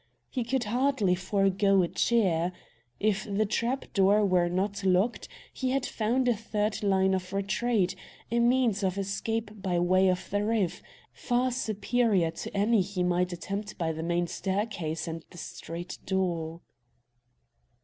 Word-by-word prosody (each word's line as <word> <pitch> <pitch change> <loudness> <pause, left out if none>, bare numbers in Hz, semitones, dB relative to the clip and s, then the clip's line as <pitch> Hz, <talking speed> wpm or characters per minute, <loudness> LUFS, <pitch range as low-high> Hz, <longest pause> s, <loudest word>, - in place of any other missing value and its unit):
He 255 - -1
could 250 +2 0
hardly 240 -3 +1
forego 195 +1 +2
a - - +1
cheer. 180 -6 +1 0.5
If 215 -1 +1
the 210 0 0
trap 235 +5 -1
door 200 +2 +4
were 180 -2 +3
not 195 +2 -1
locked, 190 +5 +2 0.3
he 260 - -2
had 270 0 0
found 240 +4 0
a 240 - +3
third 210 -1 -2
line 190 -2 +3
of 185 0 -2
retreat, 200 -1 0 0.4
a 235 - +2
means 235 -3 +3
of 190 -1 0
escape 210 +2 -3
by 185 -2 0
way 185 +2 +4
of 185 0 -1
the 205 +1 +1
roof, 210 -5 0 0.3
far 250 +1 0
superior 220 -6 +1
to 200 - -6
any 210 +1 +3
he 185 -1 -2
might 180 0 +1
attempt 200 +4 -5
by 165 -2 0
the 160 0 -5
main 175 +1 0
staircase 190 -4 -2
and 165 0 -5
the 175 - -14
street 170 +1 -7
door. 170 -3 -1
200 Hz, 150 wpm, -28 LUFS, 180-225 Hz, 0.5 s, door